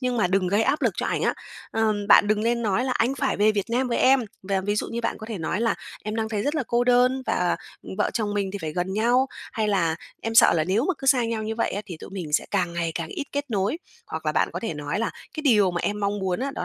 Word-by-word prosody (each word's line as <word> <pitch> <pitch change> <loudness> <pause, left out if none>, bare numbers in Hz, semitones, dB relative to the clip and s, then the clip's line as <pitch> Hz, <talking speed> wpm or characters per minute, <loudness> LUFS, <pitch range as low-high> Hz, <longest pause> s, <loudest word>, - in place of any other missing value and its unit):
nhưng 250 -1 -1
mà 210 - +3
đừng 185 0 +1
gây 205 +4 +2
áp 295 - +1
lực - - +3
cho - - -1
ảnh - - -1
á. - - +2 0.4
Ừm, 215 -2 0
bạn 205 - +7
đừng 215 0 +2
lên 235 +1 +1
nói 220 +4 +1
là 260 - 0
"Anh 245 +2 +1
phải 275 -1 0
về 210 +2 +4
Việt 205 +1 -2
Nam 250 +2 +1
với 235 - 0
em!", 265 +1 +5 0.2
và 195 0 0
ví 205 +2 -1
dụ - - -1
như 235 - -3
bạn 230 - -2
có 220 - -8
thể 220 -3 -5
nói 170 +5 -2
là 230 - +2 0.3
"Em 215 +1 -3
đang 220 -1 -1
thấy 210 -2 -2
rất 290 +7 -1
là 310 - 0
cô 240 +1 +1
đơn 250 +1 +3
và, 180 -1 +1 0.3
ừm, - - -8
vợ - - +2
chồng 210 -3 -1
mình 200 -2 -1
thì 200 - -4
phải 155 -1 -4
gần 180 +2 -2
nhau.", 240 +5 +3 0.3
hay 215 -1 0
là 170 -6 +1 0.3
"Em 225 0 -3
sợ - - +7
là 160 -2 +1
nếu 200 - +1
mà 375 - +1
cứ 270 - -7
xa 255 -3 +5
nhau 230 -1 -2
như 220 +1 -3
vậy 230 - 0
á 205 - -3
thì 175 - -7
tụi - - -9
mình 175 -6 -6
sẽ - - +2
càng 180 -4 0
ngày 170 -1 -2
càng - - -3
ít 350 -8 -4
kết 285 -1 -3
nối.", 205 - 0 0.3
hoặc 160 0 -6
là 155 - +2
bạn - - +2
có 175 - -4
thể 220 -9 -3
nói 150 +5 -3
là 230 - 0 0.2
"Cái 310 - -4
điều 210 -10 +4
mà 175 -1 -2
em 210 +3 -2
mong 200 0 0
muốn 185 -2 -1
á, 275 +2 -1
đó - - -3
215 Hz, 305 wpm, -25 LUFS, 190-240 Hz, 0.4 s, bạn